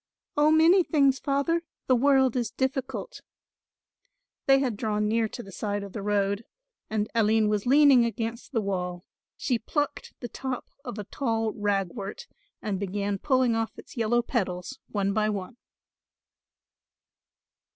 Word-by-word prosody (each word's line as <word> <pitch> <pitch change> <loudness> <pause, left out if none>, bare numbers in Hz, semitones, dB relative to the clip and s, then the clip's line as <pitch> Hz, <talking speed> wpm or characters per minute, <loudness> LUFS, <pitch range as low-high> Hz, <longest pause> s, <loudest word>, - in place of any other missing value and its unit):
"Oh, 295 +1 +4
many 325 +4 +6
things, 275 -5 +3
Father; 280 +4 +1 0.2
the 255 - +4
world 265 0 +4
is 240 -3 0
difficult." 265 - -3 1.3
They 270 0 +7
had 260 -5 0
drawn 210 -1 0
near 225 +1 +2
to 240 - -8
the 195 - -11
side 205 +1 -3
of 200 - -9
the 210 - -4
road 200 +1 0 0.5
and 215 -1 0
Aline 220 -1 +3
was 210 +1 -1
leaning 275 -2 +7
against 230 +1 -3
the 230 -5 +1
wall; 180 -3 -3 0.3
she 245 -4 0
plucked 290 +6 -3
the 240 - -5
top 260 0 -4 0.2
of 245 -4 -6
a 210 - -4
tall 225 -1 -1
ragwort 205 - -2 0.4
and 200 -3 -2
began 200 0 -2
pulling 255 -2 +2
off 225 0 -2
its - - -12
yellow 240 0 +2
petals 200 +1 -3
one 200 -1 0
by 215 +1 +2
one. 205 +3 -4
225 Hz, 145 wpm, -27 LUFS, 205-265 Hz, 1.3 s, They